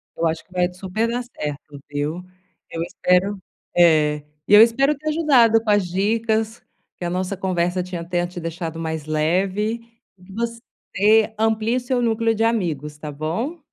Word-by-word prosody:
Eu 165 - +1
acho 160 +1 -2
que - - -36
vai 180 -1 +1
t 180 - -13
super 200 +5 -1
dar 245 +1 -2
certo, 150 - -7
viu? 150 +5 -3 0.5
Eu 165 - -5
espero 180 +4 +1 0.4
É. 155 -4 +4 0.2
E - - +2
eu 210 - +10
espero 275 +6 +2
ter 310 +1 -3
ajudado 250 -8 +4
com 215 - -3
as 205 -3 +3
dicas, 220 +4 0 0.4
que 175 - -5
a - - -1
nossa 185 +2 -2
conversa 180 -1 0
tinha 175 -2 -5
tenha 175 0 -1
te 175 0 -7
deixado 165 0 -5
mais 160 -2 -4
leve 190 +9 0 0.4
e 180 - -21
que 190 +1 -14
você 220 -2 0
amplie 220 +1 +1
o - - +1
seu 245 0 -1
núcleo 225 -1 +1
de 225 +1 0
amigos, 160 -10 -1
tá 150 0 -7
bom? 180 - -3
190 Hz, 180 wpm, -22 LUFS, 165-225 Hz, 0.5 s, eu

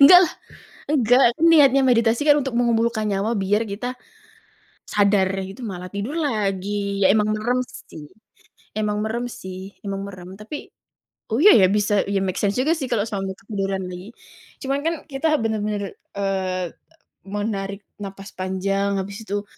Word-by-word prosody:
Enggak 310 +6 +10
lah! - - -4 0.6
Enggak. 250 -3 +4
Aku - - -21
niatnya 275 -4 +6
meditasi, 230 -1 +3
kan, 290 - +7
untuk 265 -3 -3
mengumpulkan 230 -2 +1
nyawa 200 +3 0
biar 205 +3 +1
kita 245 +5 -5 0.9
sadar 200 -2 +2 0.2
gitu, 195 +7 -10
malah 180 -4 -5
tidur 205 +9 -3
lagi. 200 - -1
Ya - - +8
emang 210 -1 +2
merem, 240 +4 0
sih 150 -10 -12 0.7
emang 210 -1 -1
merem, 235 +3 -2
sih, 185 -6 -8 0.3
emang 195 0 -3
merem. 185 -1 -10
Tapi 225 +8 -8 0.6
oh 230 - +2
iya, 420 - +9
ya, 195 - +6
bisa, 205 0 +1 0.2
iya 200 -1 +1
make 190 -1 -2
sense 205 -1 +1
juga, 305 +6 +3
sih, 270 - -3
kalau 215 -2 +1
sampai 195 -2 -3
ketiduran 195 -1 -3
lagi. 180 +6 -9 0.5
Cuman, 275 +1 -1
kan, 330 0 +1
kita 305 +3 0
benar-benar, 215 -2 -1 0.3
eee, 190 -3 -1
e - - -34 0.5
menarik 200 0 -3 0.2
napas 195 0 -8
panjang, 195 +2 -1
habis 195 +2 -4
itu, 205 +1 -2
205 Hz, 155 wpm, -22 LUFS, 195-235 Hz, 0.9 s, Enggak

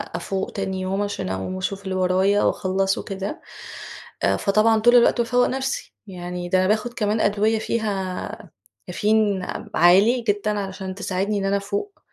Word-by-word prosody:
أفوق 190 +3 -3
تاني 190 -1 -3
يوم 190 +2 -1
عشان 205 - -3
أقوم 95 - -3
واشوف 195 +1 -4
اللي 190 -1 -3
ورايا 185 +2 +2
واخلّصُه 195 +1 0
وكده، 195 - -5 0.8
أ - - +3
فطبعًا 215 +2 +3
طول 240 +3 +5
الوقت 240 0 +5
بافوّق 245 +1 +2
نفسي، 265 +1 -3
يعني 180 -1 -6
ده 185 - +3
أنا 185 - +2
باخد 220 +3 0
كمان 215 -2 0
أدوية 215 +2 +2
فيها 200 -5 -3 0.4
كافيين، 210 -3 +1 0.3
عالي 195 +9 +5
جدًا 205 0 0
علشان 190 -1 -5
تساعدني 200 +1 -1
إن 195 - -2
أنا 195 +1 +2
أفوق، 200 - -4
200 Hz, 155 wpm, -23 LUFS, 185-215 Hz, 0.8 s, طول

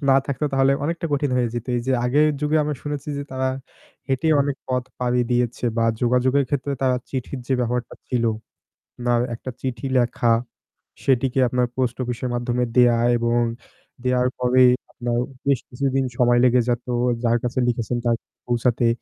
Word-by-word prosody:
না 135 - +6
থাকতো 140 +1 -2
তাহলে 135 0 +4
অনেকটা 165 +2 -2
কঠিন 145 -1 +1
হয়ে 120 -2 +2
যেত। 120 -1 -4
এই 120 - 0
যে 135 - +2
আগের 145 +5 +4
যুগে 150 +1 +1
আমরা 150 0 -2
শুনেছি 145 -1 -5
যে 140 - -3
তারা 130 0 0 0.6
হেঁটে 135 +4 +1
অনেক 140 0 0
পথ 125 -1 0 0.2
পাড়ি 125 0 +1
দিয়েছে 120 0 0
বা 115 - +2 0.2
যোগাযোগের 125 +3 +2
ক্ষেত্রে 140 0 -1
তারা 130 -1 +3
চিঠির 130 0 -4
যে - - -1
ব্যবহারটা 125 0 -2
ছিল, 120 -2 0 0.8
now 120 -1 +3 0.2
একটা 125 - -8
চিঠি 130 -2 -4
লেখা 120 -1 +2 0.7
সেটিকে 130 0 +2
আপনার 125 +1 +1
পোস্ট 125 -2 0
অফিসের 125 +1 -3
মাধ্যমে 120 0 0
দেওয়া 120 -2 +5 0.2
এবং 120 0 +1 0.6
দেওয়ার 125 0 +2
পরে 125 +1 +4 0.3
আপনার 120 -1 -2 0.3
বেশ 140 -3 +3
কিছুদিন 135 +1 0
সময় 120 -1 +4
লেগে 125 0 +5
যেত 120 0 -1 0.4
যার 120 0 +3
কাছে 125 +1 -1
লিখেছেন 120 0 -1
তার 120 -1 +3
কাছে - - -71
পৌঁছাতে 120 0 +1
125 Hz, 165 wpm, -22 LUFS, 120-135 Hz, 0.8 s, না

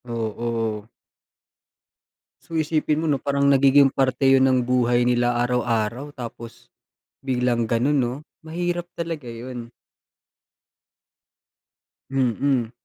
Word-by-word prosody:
Oo. 115 -1 -3 1.5
So, 165 - -10
isipin 155 0 0
mo - - -1
‘no, 140 - +2
parang 140 +1 -1
nagiging 140 0 +5
parte 130 0 0
'yon 135 0 +5
ng 130 -1 +3
buhay 120 -1 +2
nila 120 0 +2
araw-araw, 120 +2 -1
tapos 115 -2 -10 0.5
biglang 125 -3 0
gano'n, 125 +6 +2
‘no? 125 -3 +1 0.3
Mahirap 175 +2 -3
talaga 160 -7 -4
'yon. 120 0 -8 2.4
Mm. 130 -2 0
125 Hz, 100 wpm, -23 LUFS, 120-140 Hz, 2.4 s, nagiging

